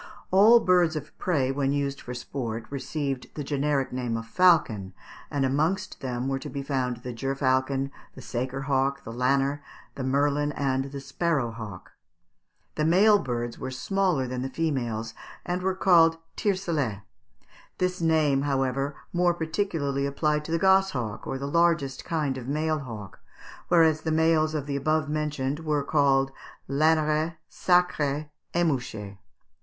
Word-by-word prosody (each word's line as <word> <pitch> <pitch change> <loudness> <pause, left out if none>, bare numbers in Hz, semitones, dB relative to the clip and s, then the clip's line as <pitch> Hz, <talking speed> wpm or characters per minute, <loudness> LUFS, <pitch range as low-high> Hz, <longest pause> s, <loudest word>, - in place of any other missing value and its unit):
All 210 +5 +7
birds 180 -5 +3
of 155 - -6
prey, 140 -8 +1
when 135 0 0
used 140 -1 -2
for 125 - -7
sport, 120 -3 -4
received 135 -1 -3
the 150 - -4
generic 140 -1 0
name 125 -3 -2
of 115 - -6
falcon; 115 - +3 0.3
and 140 -2 0
amongst 155 +8 0
them 125 -1 -3
were 135 0 -1
to - - -7
be 140 -1 -5
found 125 -3 -2
the 125 -2 -5
gerfalcon, 135 +1 0 0.2
the - - -10
saker 130 +2 -3
hawk, 140 0 0
the 115 - -7
lanner, 135 +3 +1 0.3
the 135 - -5
merlin, 145 +2 +1
and 135 -2 0
the 140 0 -6
sparrow 140 -2 -1
hawk. 110 -5 -9 0.8
The 155 - -1
male 200 +6 +5
birds 120 -4 -3
were 130 - -4
smaller 180 +1 0
than 125 0 -4
the 135 - -3
females, 120 -8 -2 0.3
and 180 +1 -2
were 190 0 0
called 165 -3 +5 0.2
tiercelet 160 - -1 0.7
this 180 -1 -1
name, 155 -4 +3
however, 135 0 0 0.2
more 175 0 +2
particularly 160 -5 -1
applied 150 +2 0
to 160 - -6
the 165 - +2
gosshawk 190 - +2
or 135 - -2
the 135 - -5
largest 160 -3 +1
kind 150 -5 -1
of 125 - -9
male 155 +2 0
hawk, 110 -8 -8 0.5
whereas 160 -3 +4
the 160 - -2
males 160 0 +3
of 145 -3 -2
the 140 -1 -3
above 155 +2 +1
mentioned 150 -2 -2
were 150 -3 0
called 135 -2 +2 0.4
_laneret, 155 +2 +2 0.2
sacret, 155 -5 +1 0.2
émouchet. 125 - -1
140 Hz, 150 wpm, -26 LUFS, 130-160 Hz, 0.8 s, All